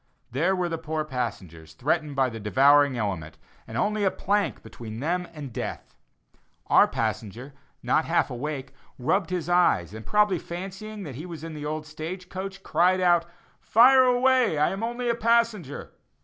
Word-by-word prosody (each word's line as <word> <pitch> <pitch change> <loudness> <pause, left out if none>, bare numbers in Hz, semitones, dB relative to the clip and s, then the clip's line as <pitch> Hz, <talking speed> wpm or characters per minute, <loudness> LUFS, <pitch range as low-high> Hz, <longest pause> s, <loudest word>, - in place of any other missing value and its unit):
There 170 +10 +1
were 180 -1 -1
the 165 -1 -3
poor 155 -1 -3
passengers, 90 - -5
threatened 150 - -1
by 135 -1 +2
the 115 - -7
devouring 135 +5 +4
element, 95 -8 -3 0.3
and 110 - -6
only 210 - 0
a 195 - +4
plank 205 +2 -1
between 110 -1 -9
them 175 +5 -1
and 145 -6 -8
death. - - -6 0.7
Our - - +5
passenger, 120 +7 -4 0.3
not - - +2
half - - +1
awake, 135 +1 -5 0.2
rubbed 180 +9 0
his 180 -3 -3
eyes 175 - +2
and 110 0 -8
probably 210 - +2
fancying 195 +4 -7
he 150 +4 -7
was 165 -3 -8
in 165 -1 -6
the 150 -1 -5
old 155 0 -4
stage 165 +4 -7
coach, 195 +1 -6
cried 180 +4 +2
out: 175 -2 +3 0.3
"Fire 255 +3 +6
away, 250 -6 +3
I 150 - +2
am 195 +2 -4
only 240 +2 -3
a 235 - +3
passenger!" 230 - 0
165 Hz, 165 wpm, -26 LUFS, 135-195 Hz, 0.7 s, Fire